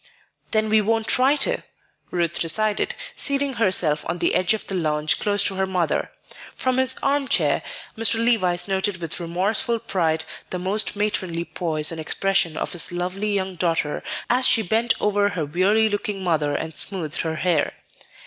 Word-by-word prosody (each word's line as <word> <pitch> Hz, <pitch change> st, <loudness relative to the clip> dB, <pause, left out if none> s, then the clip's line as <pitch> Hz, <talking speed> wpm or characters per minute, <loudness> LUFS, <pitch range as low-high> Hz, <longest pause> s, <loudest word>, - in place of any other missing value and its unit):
"Then 215 Hz, 0 st, +1 dB
we 215 Hz, 0 st, +4 dB
won't 225 Hz, +1 st, 0 dB
try 265 Hz, +5 st, +4 dB
to," -, -, -1 dB, 0.5 s
Ruth 170 Hz, -2 st, 0 dB
decided, 210 Hz, +6 st, +1 dB, 0.2 s
seating 280 Hz, -1 st, +1 dB
herself 175 Hz, -7 st, +3 dB
on 175 Hz, -, -1 dB
the -, -, +1 dB
edge 185 Hz, +4 st, +2 dB
of 220 Hz, -, -6 dB
the -, -, -5 dB
lounge 155 Hz, -3 st, 0 dB
close 205 Hz, -1 st, +2 dB
to 195 Hz, -, +1 dB
her 190 Hz, 0 st, 0 dB
mother. 180 Hz, -4 st, -1 dB, 0.5 s
From 255 Hz, 0 st, 0 dB
his 260 Hz, 0 st, +1 dB
armchair, 275 Hz, 0 st, +2 dB, 0.3 s
Mr. 225 Hz, +1 st, +3 dB
Levice 205 Hz, -7 st, +2 dB
noted 195 Hz, 0 st, -1 dB
with 165 Hz, -1 st, -1 dB
remorseful 200 Hz, +8 st, +1 dB
pride 160 Hz, -7 st, -1 dB, 0.2 s
the 185 Hz, -, -3 dB
almost 195 Hz, +5 st, -1 dB
matronly 185 Hz, -5 st, -1 dB
poise 155 Hz, -4 st, -1 dB
and 165 Hz, -1 st, -5 dB
expression 175 Hz, -1 st, 0 dB
of -, -, -2 dB
his 175 Hz, +1 st, +1 dB
lovely 185 Hz, +4 st, -2 dB
young 190 Hz, -2 st, -2 dB
daughter 165 Hz, -3 st, 0 dB, 0.3 s
as 255 Hz, +2 st, +3 dB
she 225 Hz, -, +5 dB
bent 225 Hz, +5 st, +1 dB
over 205 Hz, 0 st, +2 dB
her 175 Hz, -6 st, -3 dB
weary 195 Hz, +8 st, +2 dB
looking 205 Hz, -2 st, -3 dB
mother 155 Hz, -5 st, 0 dB
and 160 Hz, 0 st, -4 dB
smoothed 165 Hz, -5 st, -2 dB
her 160 Hz, -1 st, -3 dB
hair. 170 Hz, -2 st, 0 dB
190 Hz, 170 wpm, -23 LUFS, 170-215 Hz, 0.5 s, she